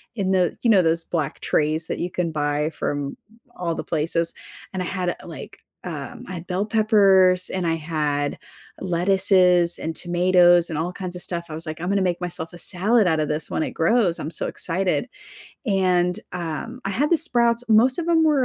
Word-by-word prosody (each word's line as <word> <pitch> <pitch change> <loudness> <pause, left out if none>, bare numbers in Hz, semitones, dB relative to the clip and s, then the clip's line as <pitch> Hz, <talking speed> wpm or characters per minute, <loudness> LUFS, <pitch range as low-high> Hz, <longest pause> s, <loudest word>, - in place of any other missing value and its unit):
in 190 -4 -1
the, 180 -3 +2
you 240 - +1
know 200 -4 +6
those 165 0 +1
black 155 -5 -3
trays 155 +2 0
that - - -4
you 175 - -2
can 175 -2 -2
buy 150 0 -1
from 145 -3 -4 0.4
all 170 -2 -2
the - - -4
places 165 +1 -1 0.4
and 185 - -3
I - - -2
had 180 -1 -2
a, - - -13
like, - - -9 0.3
um, 240 0 -7
I - - -5
had 170 0 -8
bell 185 +3 -1
peppers 195 -4 +4
and 180 -2 -2
I 165 - +1
had 150 -3 -2 0.4
lettuces 180 -1 +3
and 160 +1 -4
tomatoes 175 0 +3
and 160 -2 -3
all 175 +2 -2
kinds 185 -1 -6
of - - -7
stuff. 170 -1 -4
I - - -7
was, 160 +2 -5
like, 155 +1 -6
I'm 175 - -2
gonna 200 0 +1
make 180 -1 -1
myself 170 -2 -5
a - - -9
salad 200 +6 +2
out 160 -3 +2
of 155 - 0
this 150 +1 -3
when - - 0
it - - -4
grows, 180 0 +2
I'm 160 - -5
so - - -1
excited. 185 +7 -1 0.6
And, 185 -4 +1
um, 180 +8 -5
I 195 - -2
had 275 +10 0
the 340 - +5
sprouts, 240 -7 +2
most 245 +6 +4
of 335 - -1
them 325 -1 +3
were 290 -4 +3
180 Hz, 210 wpm, -23 LUFS, 165-195 Hz, 0.6 s, know